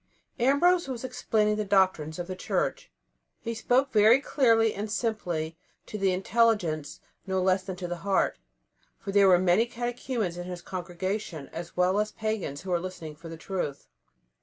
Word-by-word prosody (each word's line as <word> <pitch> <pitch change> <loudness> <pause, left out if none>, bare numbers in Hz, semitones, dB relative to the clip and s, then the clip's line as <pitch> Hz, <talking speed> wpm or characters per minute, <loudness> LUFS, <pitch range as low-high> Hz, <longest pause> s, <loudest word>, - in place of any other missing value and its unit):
Ambrose 285 +7 +3
was 255 -3 -5
explaining 215 -4 0
the 215 - 0
doctrines 190 -6 +2
of 175 - -4
the 185 +1 -5
Church. - - -2 0.5
He 230 - -3
spoke 255 +4 +1
very 220 +4 +6
clearly 230 -6 +3
and 210 +2 -4
simply, 175 -9 -2 0.3
to - - -9
the 195 -1 +2
intelligence 185 -6 +1 0.3
no 190 0 0
less 185 0 +2
than 190 -1 -6
to 180 0 -5
the 175 0 -4
heart, 190 - 0 0.6
for 195 - -6
there 200 0 +5
were 185 -1 +7
many 185 +6 +3
catechumens 240 -5 -3
in 175 - -5
his 180 -1 -7
congregation, 180 -3 -4
as 170 +1 -8
well 185 +3 +3
as 210 0 0
pagans 215 -10 -3
who 185 0 -6
were 175 +1 0
seeking 160 -4 -9
for 165 +2 -11
the 165 - -8
truth. 160 -4 -4
195 Hz, 170 wpm, -28 LUFS, 175-225 Hz, 0.6 s, were